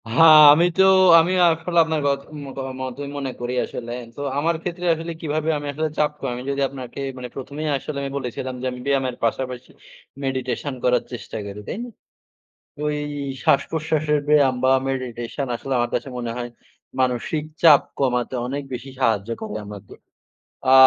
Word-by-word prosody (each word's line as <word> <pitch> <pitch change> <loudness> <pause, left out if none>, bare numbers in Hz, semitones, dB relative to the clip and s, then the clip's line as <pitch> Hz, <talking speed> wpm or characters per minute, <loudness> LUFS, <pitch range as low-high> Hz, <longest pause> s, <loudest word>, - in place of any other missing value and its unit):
হ্যাঁ 165 - +7 0.3
আমি 165 +3 +4
তো 190 - +6 0.4
আমি 165 +3 +2 0.2
আসলে 170 +1 0
আপনার 160 -1 -1
কথ 140 0 +1 0.3
মোকা 135 0 -6 0.2
মতই 130 +2 -5
মনে 135 -2 -3
করি 120 +1 -2
আসলে। 120 -1 -7 0.2
তো, - - -7 0.2
আমার 165 +4 +1
ক্ষেত্রে 175 0 -4
আসলে 165 +1 -5
কিভাবে 155 0 -1
আমি 145 0 -5
আসলে 155 +2 -1
চাপ 150 -1 +2
কমাই, 125 -2 -3
যদি 140 0 -1
আপনাকে 130 -2 -8 0.2
মানে 125 -1 -6
প্রথমেই 145 +3 -5
আসলে 140 +2 -6
আমি 140 0 -4
বলেছিলাম 130 0 -4
যে, - - -4
আমি 125 - -7
ব্যায়ামের 135 -3 0
পাশাপাশি 125 +2 -2 0.5
meditation 130 +1 -2
করার 125 -1 +3
চেষ্টা 120 -2 -7
করি, 100 0 -7
তাই - - -4
না? 245 - -7 1.0
ওই 150 0 0 0.5
শ্বাসপ্রশ্বাসের 155 0 +1
ব্যায়াম 145 -3 +5
বা 130 - +5 0.2
meditation 130 0 -3
আসলে 135 +3 -6
আমার 120 0 0
কাছে - - -2
মনে 120 -1 -3
হয়, 120 -1 -4 0.5
মানসিক 130 +4 0 0.2
চাপ 155 -4 +8 0.2
কমাতে 125 -2 0
অনেক 140 +3 -3
বেশি 130 +2 -7
সাহায্য 110 -4 +1
করে 105 - -4
আমাকে। 100 -1 -10 0.8
আ - - +6
135 Hz, 165 wpm, -22 LUFS, 125-150 Hz, 1.0 s, চাপ